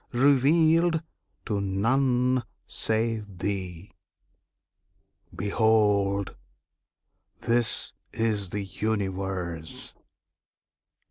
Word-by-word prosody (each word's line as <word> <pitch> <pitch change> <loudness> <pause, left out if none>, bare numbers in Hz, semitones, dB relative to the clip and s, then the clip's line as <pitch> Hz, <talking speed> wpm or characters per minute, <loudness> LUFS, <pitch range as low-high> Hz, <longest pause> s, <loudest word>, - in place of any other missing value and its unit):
revealed 155 +6 +4 0.4
to 105 -4 -1
none 125 +6 +2 0.2
save 110 -3 -1
thee. 95 -1 -4 1.4
Behold! 100 -1 +2 1.1
this 120 0 +1 0.2
is 105 -4 -1
the 100 +2 -3
Universe! 95 -5 -3
105 Hz, 55 wpm, -27 LUFS, 95-125 Hz, 1.4 s, revealed